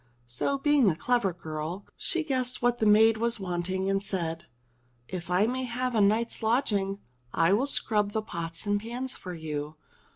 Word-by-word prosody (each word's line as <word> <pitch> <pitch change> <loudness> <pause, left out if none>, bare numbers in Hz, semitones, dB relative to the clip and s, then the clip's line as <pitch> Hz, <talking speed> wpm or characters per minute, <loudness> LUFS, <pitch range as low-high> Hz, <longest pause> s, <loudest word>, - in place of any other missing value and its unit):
So, 120 - -1
being 280 -5 +4
a 160 - 0
clever 240 +1 +1
girl, 160 +3 -6
she 335 -1 0
guessed 255 -4 0
what 240 0 +1
the 220 - +2
maid 220 +1 +6
was 235 0 0
wanting 185 0 -2
and 195 0 +1
said: 170 -5 -3 0.6
*'If 180 -2 -6
I 180 +3 +3
may 255 +2 -1
have 250 +1 -2
a 220 - +3
night's 220 +4 +2
lodging, 215 -4 +1 0.4
I 165 +3 +4
will 250 +7 +2
scrub 210 -6 +1
the 220 +1 -2
pots 165 -3 -3
and 205 0 +1
pans 245 +3 -3
for 180 -1 -7
you." 155 -1 -5
205 Hz, 175 wpm, -28 LUFS, 180-240 Hz, 0.6 s, maid